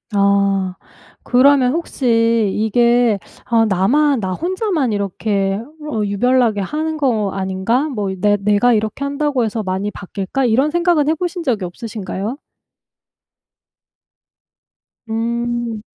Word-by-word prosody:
아 200 -2 +2 0.5
그러면 255 +1 +4
혹시 230 - +1
이게 235 0 +2 0.3
아 230 -2 +3
'나만 240 +7 +2
나 185 -1 -2
혼자만 345 - -1
이렇게 200 0 -1 0.3
어 220 - -1
유별나게 225 +1 +2
하는 310 +9 -2
거 225 -9 0
아닌가?' 195 +9 -1
뭐 210 -8 -3
이 190 - -4
'내 205 +1 +3
내가 210 +4 +3
이렇게 215 +5 -1
한다고 280 -2 0
해서 220 0 -2
많이 190 +2 -2
바뀔까?' 200 +7 -3
이런 265 +6 +2
생각은 340 -3 +2
해보신 345 +2 -2
적이 225 - -1
없으신가요? 210 +3 -5 2.7
음. 235 0 -2
230 Hz, 235 characters per minute, -18 LUFS, 200-270 Hz, 2.7 s, 그러면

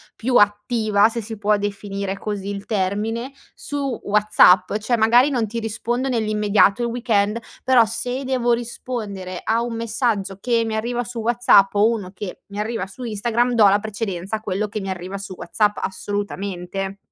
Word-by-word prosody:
più 245 +2 -1
attiva, 210 0 +3
se 230 0 -4
si 220 0 -7
può 210 0 +2
definire 200 -1 -4
così 205 -2 -4
il 200 0 -5
termine, 215 +5 -1 0.2
su 275 -4 -4
WhatsApp. 205 -3 +4
Cioè 220 +3 0
magari 240 +5 +4
non 240 -5 0
ti 230 +3 -4
rispondo 235 +3 -2
nell'immediato 215 -2 +2
il 235 - 0
weekend, 230 -3 0 0.2
però 255 -2 +5
se 245 +4 -2
devo 255 -2 0
rispondere 215 -6 -5
a 230 +1 +1
un 240 -1 -4
messaggio 225 -4 -1
che 235 +1 +1
mi 220 -1 -2
arriva 240 +2 -1
su 240 +1 -8
WhatsApp 225 -4 +4
o 205 +2 +4
uno 210 -6 -3
che 200 -1 -7
mi 200 +1 -7
arriva 220 -2 -2
su 195 +6 -13
Instagram 235 +2 0
do 215 -3 +6
la 200 +1 +4
precedenza 200 -2 -4
a 215 - -5
quello 210 0 -2
che 215 - -5
mi 195 - -5
arriva 185 +2 -5
su 195 -1 -7
WhatsApp 210 +4 0
assolutamente 195 -1 -4
215 Hz, 170 wpm, -21 LUFS, 200-235 Hz, 0.2 s, do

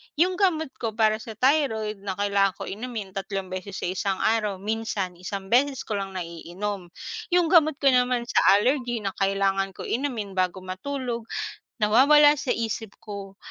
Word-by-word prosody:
'yun 360 +4 +2
gamot 320 -7 +2
ko 225 -3 -3
para 215 -1 +3
sa 220 0 -8
thyroid 220 -5 +1
na 195 -1 -4
kailangan 200 -1 +2
ko - - -7
inumin 215 -2 -5
3 195 -1 -4
beses 185 +1 -5
sa - - -3
1 190 0 -1
araw, 215 -2 +1
minsan 200 -3 -3
1 195 +2 -6
beses 265 +2 +3
ko 210 -2 -2
lang 195 -1 -5
naiinom, 180 +3 -5 0.4
'yung 350 -3 +2
gamot 315 -4 +5
ko 275 -1 +3
naman 250 -1 +2
sa 235 - +1 0.2
allergy 240 +1 +1
na 195 - -1
kailangan 195 -1 +1
ko - - -7
inumin 235 -6 -2
bago 185 0 -1
matulog, 235 +4 -4 0.5
nawawala 275 +7 +6
sa 265 - -1
isip 220 -2 -4
ko. 200 -2 -8
215 Hz, 165 wpm, -25 LUFS, 195-255 Hz, 0.5 s, nawawala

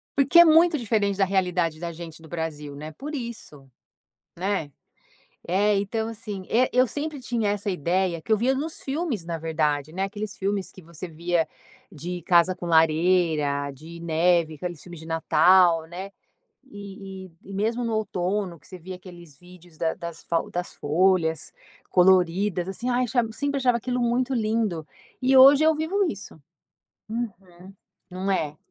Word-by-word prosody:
Porque 280 +4 +5
é 345 - +10
muito 325 0 +5
diferente 205 -5 0
da 195 - +3
realidade 180 -4 0
da 170 +1 -5
gente 165 -1 -10
do 160 - -14
Brasil, 150 -3 -5
né, 155 +2 -7
por 295 - -7
isso, 230 - -7 0.7
né. 185 -5 -2 0.8
É, 205 +4 +3
então 220 +3 -2
assim, 210 -4 -6
eh, 250 +3 +3
eu 255 +1 +4
sempre 295 +3 -4
tinha 235 -4 -1
essa 205 0 -2
ideia 180 0 0
que 160 - -15
eu 220 - +5
via 250 +5 +1
nos 310 +4 -4
filmes 275 - -2
na 165 -1 -4
verdade, 155 -2 -1
né, 190 +3 -3
aqueles 205 +1 -5
filmes 195 0 -2
que 185 - -14
você 170 +2 -8
via 165 0 -1 0.4
de 175 +1 -6
casa 175 +2 +4
com 175 -1 -7
lareira, 160 -3 +2
de 165 +5 -11
neve, 170 0 +2
aqueles 175 +1 -6
filmes 175 -3 -10
de 160 - -11
Natal, 165 +1 +4
né. 185 +4 -7 0.5
E 195 -5 -9 0.2
e - - -14
e - - -7
mesmo 225 +5 -1
no 230 -1 -2
outono 190 -3 -2
que 140 - -17
você 185 - -9
via 185 +2 -8
aqueles 175 -5 -13
vídeos 175 -2 -17
da 160 0 0
das 170 -2 -8
fau 165 -1 -1
das 175 0 -4
folhas 160 +1 +1 0.4
coloridas, 180 0 +3
assim, 235 +6 -3
ai, 250 0 +2 0.3
sempre 285 +4 -2
achava 250 -3 +2
aquilo 250 +1 -2
muito 245 +2 +1
lindo, 215 -8 -1 0.3
e 260 +1 +3
hoje 275 +3 +8
eu 320 0 +5
vivo 355 +6 0
isso. 200 -5 -8 0.7
Uhum. 195 -5 -7 0.4
Não 185 +2 -3
é. 155 -6 -1
185 Hz, 165 wpm, -25 LUFS, 165-225 Hz, 0.8 s, é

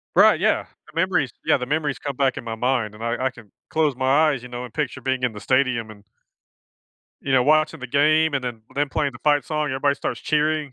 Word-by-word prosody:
Right, - - +6
yeah, - - +1 0.3
the - - -1
memories - - +1
yeah, - - +5
the 125 - -3
memories 145 0 -1
come 140 -3 -5
back 135 -2 +1
in - - -6
my 115 -1 -4
mind 115 -3 -1
and 110 - -11
I 115 0 -1
I - - +2
can 115 -5 -16 0.2
close 150 -5 +1
my 135 +4 +3
eyes, 135 -5 -1
you 125 - -9
know, 125 +1 -5
and 120 - -11
picture 140 -4 -2
being 130 0 -1
in 125 -3 +1
the 105 - -9
stadium 130 -4 +1
and 105 -1 -14 1.2
you 135 - -2
know, 125 -2 +4
watching 155 +2 +3
the 130 - -6
game, 155 +3 +3
and 135 - 0
then 120 -3 -5
them 145 0 0
playing 140 0 -1
the 120 - -11
fight 145 -1 +2
song, 150 -1 -1
everybody 140 +2 +1
starts - - -4
cheering. 150 -1 0
135 Hz, 240 wpm, -23 LUFS, 125-150 Hz, 1.2 s, Right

